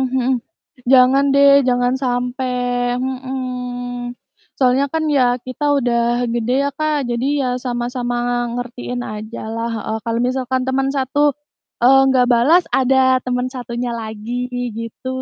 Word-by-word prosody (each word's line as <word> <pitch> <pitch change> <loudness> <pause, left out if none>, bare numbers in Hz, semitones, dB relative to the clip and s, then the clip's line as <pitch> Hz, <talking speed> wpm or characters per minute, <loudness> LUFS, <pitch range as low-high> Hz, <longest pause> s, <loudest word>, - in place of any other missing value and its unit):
mhm, 255 0 +1 0.6
jangan 265 +2 +6
deh, 280 0 +6 0.2
jangan 245 0 +2
sampai 250 +1 -1 0.4
mhm. 250 -1 -4 0.4
Soalnya 260 +1 +3
kan 320 -1 0
ya, 255 - +4 0.2
kita 255 +3 -6
udah 240 -2 +1 0.3
gede 240 +1 -1
ya, 280 - 0
Kak, 310 -1 0
jadi 240 +2 -1 0.2
ya 255 - -1 0.2
sama-sama 245 0 -2 0.4
ngertiin 245 0 -5
aja 215 +2 -7
lah 230 +1 -2
heeh. 220 0 -3
Kalau 230 0 -1
misalkan 260 0 -1
teman 270 +1 +1
satu, 270 +2 -1 0.6
eee, 270 +2 +7
nggak 255 -2 +4
balas, 300 +10 +4
ada 265 0 +2 0.3
teman 250 0 -1
satunya 240 -1 -4
lagi, 220 +1 -7 0.5
gitu. 230 +3 -7
250 Hz, 130 wpm, -19 LUFS, 245-260 Hz, 0.6 s, eee